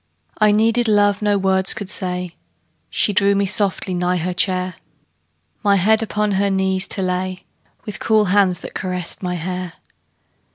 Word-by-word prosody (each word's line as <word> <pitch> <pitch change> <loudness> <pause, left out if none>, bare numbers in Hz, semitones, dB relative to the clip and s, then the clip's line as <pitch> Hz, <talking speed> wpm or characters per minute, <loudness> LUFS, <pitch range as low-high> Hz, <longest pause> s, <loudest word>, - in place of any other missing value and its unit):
I 215 -1 +5
needed 225 +3 +2
love 205 -1 +3
no 205 -1 +2
words 190 -1 +3
could 205 - -6
say; 180 -3 -3 0.5
She 205 - 0
drew 200 0 +3
me 200 0 +1
softly 190 -1 0
nigh 180 0 0
her 180 +2 -2
chair, 185 +1 -1 0.8
My 200 -2 +3
head 215 +4 +3
upon 210 -1 -1
her 200 +1 +1
knees 190 -1 +1
to 195 - -1
lay, 185 0 -3 0.4
With 205 -6 -5
cool 215 -1 +2
hands 190 -3 +2
that - - -9
caressed 180 -3 -4
my 180 -1 -3
hair. 180 +1 -5
190 Hz, 160 wpm, -19 LUFS, 180-205 Hz, 0.8 s, I